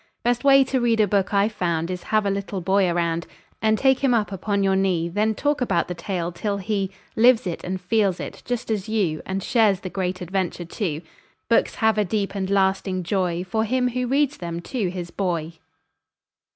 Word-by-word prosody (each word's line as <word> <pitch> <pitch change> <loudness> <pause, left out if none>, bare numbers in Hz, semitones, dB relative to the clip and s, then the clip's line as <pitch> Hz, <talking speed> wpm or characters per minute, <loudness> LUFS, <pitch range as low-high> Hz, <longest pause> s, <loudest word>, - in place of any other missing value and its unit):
Best 240 +1 +1
way 275 -1 +7
to 260 -1 -1
read 230 -2 +2
a 215 - +5
book 195 -1 +1
I've 200 +2 +2
found 170 -4 -1
Is 180 -1 -4
have 215 -1 +2
a 200 - +1
little 200 0 -3
boy 190 +1 +2
around 170 -1 -1 0.3
And 220 0 +3
take 265 +1 +3
him 265 -3 +3
up 210 -3 0
upon 200 +1 -1
your 195 0 +3
knee; 185 -3 +1
Then 215 +4 0
talk 290 +2 0
about 190 -9 +1
the 180 - -3
tale, 175 0 -3
till 200 +3 -2
he 200 -1 -1 0.3
Lives 235 0 +5
it 175 -2 -4
and 185 +1 -3
feels 195 0 +1
it, - - -7
just 245 -2 -3
as 210 -2 -2
you, 190 -8 0
And 190 0 -2
shares 210 -5 +3
the 185 - -6
great 185 -1 -2
adventure, 180 -1 -2
too. 170 -3 -3 0.5
Books 230 - +2
have 220 -1 +2
a - - +4
deep 200 0 -2
and 190 -2 -3
lasting 190 -1 +1
joy 180 -1 -1
For 220 +4 -1
him 250 +3 +1
who 250 0 -2
reads 285 +2 +1
them 170 -1 -5
to 215 -1 -2
his 175 -1 -6
boy. 170 -4 -3
195 Hz, 205 wpm, -23 LUFS, 180-220 Hz, 0.5 s, way